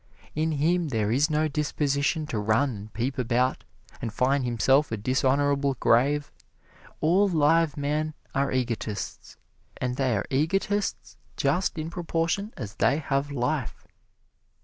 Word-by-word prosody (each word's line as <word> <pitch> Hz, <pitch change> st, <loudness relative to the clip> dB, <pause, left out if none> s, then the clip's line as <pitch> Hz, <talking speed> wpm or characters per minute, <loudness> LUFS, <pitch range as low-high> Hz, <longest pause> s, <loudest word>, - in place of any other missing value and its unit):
In 160 Hz, +1 st, 0 dB
him 165 Hz, +4 st, +1 dB
there 110 Hz, -6 st, 0 dB
is 140 Hz, +6 st, +3 dB
no 155 Hz, 0 st, +1 dB
disposition 145 Hz, 0 st, 0 dB
to 115 Hz, -8 st, -3 dB
run 110 Hz, +6 st, +2 dB
and 105 Hz, +2 st, -9 dB
peep 130 Hz, +4 st, -2 dB
about, 125 Hz, +1 st, +1 dB, 0.4 s
and 115 Hz, -, -3 dB
find 130 Hz, +4 st, +1 dB
himself 125 Hz, +4 st, +2 dB
a 110 Hz, -, -1 dB
dishonorable 135 Hz, +4 st, +1 dB
grave. 140 Hz, +5 st, +2 dB, 0.7 s
All 185 Hz, +6 st, +4 dB
live 165 Hz, -2 st, +3 dB
men 150 Hz, +2 st, -1 dB, 0.2 s
are 140 Hz, +1 st, +1 dB
egotists, 115 Hz, -4 st, -3 dB, 0.4 s
and 125 Hz, 0 st, -2 dB
they 130 Hz, -5 st, +1 dB
are 100 Hz, -, -2 dB
egotists 195 Hz, +8 st, -1 dB, 0.2 s
just 160 Hz, +6 st, +1 dB
in 155 Hz, +1 st, -4 dB
proportion 170 Hz, +4 st, -1 dB
as 105 Hz, -5 st, -6 dB
they -, -, +3 dB
have 140 Hz, -2 st, -1 dB
life. 135 Hz, -1 st, -2 dB
140 Hz, 135 wpm, -26 LUFS, 125-155 Hz, 0.7 s, All